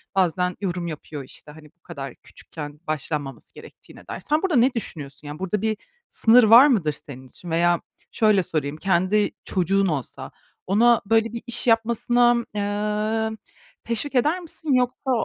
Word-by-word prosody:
bazen 180 Hz, -1 st, +1 dB
yorum 180 Hz, -2 st, -3 dB
yapıyor, 150 Hz, -2 st, -7 dB
işte, 140 Hz, +3 st, -11 dB
hani, 155 Hz, 0 st, -14 dB
bu 175 Hz, -, -54 dB
kadar 135 Hz, -1 st, -8 dB
küçükken 150 Hz, -2 st, -10 dB
başlanmaması 150 Hz, -2 st, -4 dB
gerektiğine -, -, -15 dB
dair. -, -, -6 dB
Sen 305 Hz, +1 st, +2 dB
burada 370 Hz, -7 st, 0 dB
ne 250 Hz, +2 st, +4 dB
düşünüyorsun? 145 Hz, -, -7 dB
Yani 145 Hz, +2 st, -7 dB
burada 190 Hz, +2 st, -2 dB
bir 220 Hz, -1 st, -1 dB, 0.3 s
sınır 235 Hz, +2 st, +5 dB
var 235 Hz, +6 st, +8 dB
mıdır 185 Hz, -, +1 dB
senin 130 Hz, -2 st, -12 dB
için? 170 Hz, +7 st, -11 dB
Veya 170 Hz, +1 st, +2 dB, 0.3 s
şöyle 210 Hz, -4 st, +3 dB
sorayım: 150 Hz, -2 st, -3 dB
Kendi 190 Hz, +4 st, +1 dB
çocuğun 195 Hz, +1 st, +1 dB
olsa 145 Hz, -7 st, -4 dB, 0.4 s
ona 230 Hz, +5 st, +4 dB
böyle 225 Hz, +1 st, +2 dB
bir 235 Hz, -, -5 dB
iş 240 Hz, +1 st, +1 dB
yapmasına, 235 Hz, +1 st, +3 dB, 0.2 s
emm, 210 Hz, +2 st, -1 dB, 0.5 s
teşvik 235 Hz, +5 st, -1 dB
eder 300 Hz, +8 st, +2 dB
misin 320 Hz, -4 st, -3 dB
yoksa 255 Hz, +1 st, 0 dB
205 Hz, 155 wpm, -23 LUFS, 160-235 Hz, 0.5 s, var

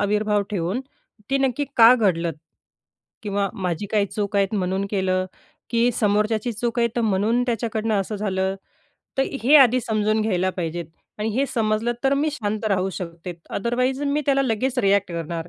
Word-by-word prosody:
आविर्भाव 210 Hz, 0 st, +1 dB
ठेवून, 190 Hz, +4 st, -1 dB, 0.5 s
ती 275 Hz, -, +2 dB
नक्की 270 Hz, +1 st, 0 dB
का 230 Hz, +2 st, +9 dB
घडलं? 175 Hz, -8 st, +1 dB, 0.9 s
किंवा 200 Hz, -1 st, -1 dB
माझी 185 Hz, -2 st, -3 dB
काही 205 Hz, -2 st, +2 dB
चूक 205 Hz, 0 st, -3 dB
आहेत 200 Hz, +1 st, +1 dB
म्हणून 190 Hz, 0 st, -1 dB
केलं? 185 Hz, -2 st, 0 dB, 0.5 s
की 235 Hz, +1 st, +3 dB
समोरच्याची 215 Hz, +2 st, +1 dB
चूक 235 Hz, +2 st, -3 dB
आहे 235 Hz, -, +3 dB
तर -, -, +2 dB
म्हणून 220 Hz, +3 st, +1 dB
त्याच्याकडनं 225 Hz, -2 st, -1 dB
असं 210 Hz, +2 st, -4 dB
झालं. 190 Hz, -2 st, -1 dB, 0.6 s
तर -, -, +5 dB, 0.2 s
हे 290 Hz, +5 st, +7 dB
आधी 255 Hz, -2 st, +6 dB
समजून 215 Hz, -1 st, 0 dB
घ्यायला 185 Hz, -3 st, +1 dB
पाहिजे 175 Hz, -2 st, -4 dB
आहेत. 165 Hz, -1 st, -9 dB, 0.3 s
आणि 215 Hz, +1 st, -1 dB
हे 275 Hz, -, +2 dB
समजलं 225 Hz, 0 st, +1 dB
तर 270 Hz, +1 st, +4 dB
मी 295 Hz, +2 st, +1 dB
शांत 215 Hz, -5 st, -3 dB
राहू 190 Hz, -1 st, 0 dB
शकते, 170 Hz, 0 st, -7 dB, 0.2 s
अदरवाईज 250 Hz, +5 st, -1 dB
मी 290 Hz, +1 st, 0 dB
त्याला 275 Hz, -1 st, +3 dB
लगेच 255 Hz, +1 st, -1 dB
रिएक्ट 200 Hz, -2 st, +2 dB
करणार. 165 Hz, 0 st, -4 dB
210 Hz, 165 wpm, -23 LUFS, 190-235 Hz, 0.9 s, का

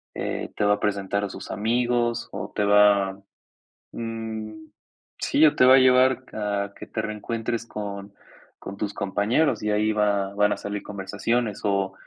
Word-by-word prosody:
eh, -, -, -4 dB
te -, -, -1 dB
va 105 Hz, -, +4 dB
a -, -, -11 dB
presentar 100 Hz, -1 st, -1 dB
a 100 Hz, -, -2 dB
sus -, -, -9 dB
amigos, 120 Hz, +2 st, 0 dB
o 100 Hz, 0 st, -6 dB
te 105 Hz, -, +1 dB
va, 100 Hz, -1 st, +4 dB, 0.7 s
mm, 115 Hz, -1 st, -5 dB, 0.7 s
sí, 155 Hz, -, +3 dB
o 150 Hz, -, +4 dB
te 125 Hz, -, +5 dB
va 130 Hz, +1 st, +8 dB
a -, -, +7 dB
llevar 130 Hz, 0 st, +4 dB
a 100 Hz, -1 st, -2 dB
que -, -, -10 dB
te 110 Hz, -, -3 dB
reencuentres 115 Hz, +2 st, -3 dB
con 100 Hz, -1 st, -6 dB, 0.5 s
con 100 Hz, -, -8 dB
tus 105 Hz, 0 st, -3 dB
compañeros 110 Hz, +7 st, +1 dB
y 105 Hz, -, 0 dB
ahí 105 Hz, +1 st, +2 dB
va 100 Hz, -2 st, 0 dB
van 105 Hz, 0 st, +3 dB
a -, -, -5 dB
salir 100 Hz, 0 st, -5 dB
conversaciones 105 Hz, +3 st, -2 dB
o 100 Hz, -2 st, 0 dB
105 Hz, 170 wpm, -24 LUFS, 100-115 Hz, 0.7 s, va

